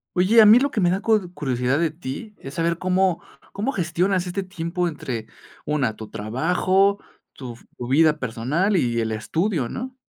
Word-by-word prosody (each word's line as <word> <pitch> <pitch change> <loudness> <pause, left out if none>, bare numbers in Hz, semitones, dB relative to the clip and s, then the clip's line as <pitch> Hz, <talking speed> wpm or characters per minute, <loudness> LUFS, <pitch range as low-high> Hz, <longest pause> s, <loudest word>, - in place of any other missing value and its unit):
Oye, 205 +6 +5
a - - +8
mí 220 +4 +8
lo 280 +1 0
que 215 - -1
me 175 - +3
da 185 - 0
cud 215 -6 +1
curiosidad 130 -1 -1
de 170 - +1
ti, 160 +7 -8
¿es 135 +1 -9
saber 170 0 0
cómo 185 -1 +1 0.3
cómo 215 +7 -2
gestionas 180 -2 0
este 190 +2 -3
tiempo 180 -1 -3
entre, 125 -8 -6 0.4
una, 140 -7 0
tu 110 -1 -9
trabajo, 180 - +1 0.3
tu 125 -3 -8
v 115 - -17 0.2
tu 120 - -6
vida 150 +3 +3
personal 130 - -1
y 120 -9 +1
el 110 -1 -1
estudio, 160 - -1
no? 255 +1 -6
170 Hz, 185 wpm, -23 LUFS, 130-190 Hz, 0.4 s, a